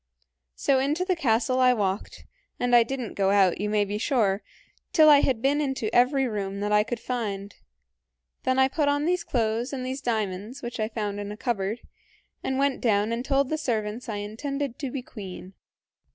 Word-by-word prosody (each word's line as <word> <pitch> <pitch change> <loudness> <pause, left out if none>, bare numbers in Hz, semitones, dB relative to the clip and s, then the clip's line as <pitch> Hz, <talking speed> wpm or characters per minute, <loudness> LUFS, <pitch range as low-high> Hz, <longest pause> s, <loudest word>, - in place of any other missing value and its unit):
"So 270 -1 +2
into 300 +7 0
the 370 -1 +1
castle 255 -3 +1
I 255 -1 +5
walked, 195 -2 -3 0.3
and 245 0 +3
I 240 - +8
did 265 +4 -2
n't 235 -4 -5
go 195 -1 +1
out, 195 -2 +3
you 210 - -1
may 210 -1 +2
be 205 +1 -3
sure, 215 -6 +1 0.5
till 310 -2 +7
I 290 - +8
had 255 -5 0
been 285 +2 +2
into 265 -6 -2
every 265 +2 +3
room 200 -3 -3
that 205 0 -1
I 210 0 +5
could 230 +2 -3
find. 205 -5 -4 0.9
Then 260 0 0
I 265 0 +5
put 285 +2 0
on 290 +1 +1
these 355 +1 +1
clothes 230 -1 -1
and 260 -2 -4
these 260 +1 -4
diamonds, 220 +1 -3
which 240 -1 -5
I 215 0 0
found 210 -3 -3
in 205 0 -5
a 210 - -7
cupboard, 220 -2 -2 0.6
and 265 - -1
went 275 -1 +1
down 210 -2 +2
and 235 +1 -2
told 275 0 +1
the 310 - -1
servants 230 -3 -2
I 215 - -2
intended 255 +6 -4
to 275 - -3
be 255 0 -5
queen. 190 -5 -9
240 Hz, 200 wpm, -26 LUFS, 210-270 Hz, 0.9 s, I